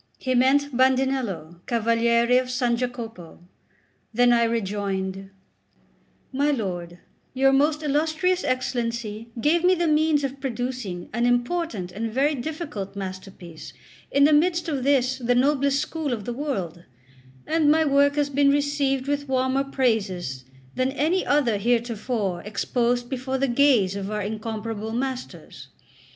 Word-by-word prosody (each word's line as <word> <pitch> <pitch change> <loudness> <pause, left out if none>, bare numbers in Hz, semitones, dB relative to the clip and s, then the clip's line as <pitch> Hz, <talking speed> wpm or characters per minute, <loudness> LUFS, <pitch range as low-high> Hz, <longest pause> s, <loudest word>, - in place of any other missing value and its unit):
He 255 - -2
meant 270 +2 +3
Bandinello, 255 -10 +1
Cavaliere 235 +1 +3
of 255 - -3
S. 250 0 -3 0.2
Jacopo. 235 -8 -6 0.7
Then 245 +1 +4
I 235 -1 +4
rejoined: 195 -3 -2 1.0
"My 285 +3 +1
lord, 180 -9 -3 0.4
your 270 +1 +4
most 300 +3 +2
illustrious 315 +5 +1
Excellency 235 -3 -2
gave 325 +7 +2
me 365 +1 +5
the 345 -1 0
means 305 -1 +2
of 275 0 -4
producing 245 -8 -4
an 240 +1 +1
important 245 - -1
and 220 +4 -4
very 275 +6 +2
difficult 285 - -5
masterpiece 185 -3 -8 0.4
in 280 - +3
the 300 +2 +5
midst 340 +3 +2
of 280 -5 -2
this 265 -1 +2
the 245 0 +1
noblest 280 +1 +2
school 310 0 -3
of 210 -4 -5
the 240 - -3
world; 195 - -4 0.6
and 315 -2 +2
my 315 +1 +4
work 285 0 +3
has 290 -1 0
been 280 0 +3
received 280 -2 0
with 285 -1 -2
warmer 260 +1 +1
praises 200 - -1 0.3
than 255 +1 0
any 320 +7 +1
other 250 -8 +2
heretofore 230 -4 -1
exposed 240 +4 -1
before 260 +1 -3
the 275 +1 +1
gaze 240 -7 +3
of 200 0 -4
our 210 -1 -2
incomparable 220 +1 -4
masters. 260 +1 -5
250 Hz, 140 wpm, -24 LUFS, 220-285 Hz, 1.0 s, me